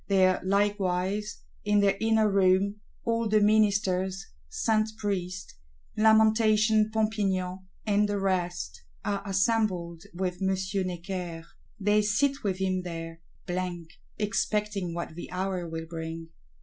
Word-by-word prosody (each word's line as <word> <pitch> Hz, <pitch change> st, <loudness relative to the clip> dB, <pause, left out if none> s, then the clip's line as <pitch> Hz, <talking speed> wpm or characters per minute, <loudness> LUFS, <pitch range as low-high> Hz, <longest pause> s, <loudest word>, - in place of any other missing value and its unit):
There 185 Hz, -2 st, +3 dB
likewise, 200 Hz, 0 st, 0 dB, 0.2 s
in 210 Hz, 0 st, +3 dB
their 195 Hz, -1 st, +3 dB
inner 220 Hz, -1 st, +3 dB
room, 195 Hz, +1 st, +3 dB, 0.3 s
"all 230 Hz, -1 st, 0 dB
the 215 Hz, 0 st, +4 dB
Ministers," 200 Hz, -3 st, +2 dB, 0.2 s
Saint 215 Hz, -, +1 dB
Priest, 185 Hz, -3 st, -3 dB, 0.4 s
Lamentation 220 Hz, 0 st, +4 dB
Pompignan 195 Hz, -4 st, -1 dB, 0.2 s
and 210 Hz, -1 st, +2 dB
the 205 Hz, -1 st, 0 dB
rest, 175 Hz, -, -2 dB, 0.2 s
are 200 Hz, -1 st, -1 dB
assembled 190 Hz, -4 st, 0 dB
with 180 Hz, +1 st, -3 dB
M. 190 Hz, 0 st, +1 dB, 0.3 s
Necker: 175 Hz, -2 st, -5 dB, 0.3 s
they 210 Hz, +1 st, +3 dB
sit 275 Hz, +7 st, +1 dB
with 195 Hz, -3 st, 0 dB
him 185 Hz, -1 st, 0 dB
there; 165 Hz, -2 st, -7 dB, 0.2 s
blank, 175 Hz, -2 st, -3 dB, 0.3 s
expecting 210 Hz, -3 st, -1 dB
what 170 Hz, -2 st, -4 dB
the 175 Hz, -, -8 dB
hour 185 Hz, -2 st, -3 dB
will 160 Hz, 0 st, -5 dB
bring. 165 Hz, 0 st, -6 dB
195 Hz, 120 wpm, -28 LUFS, 180-210 Hz, 0.4 s, the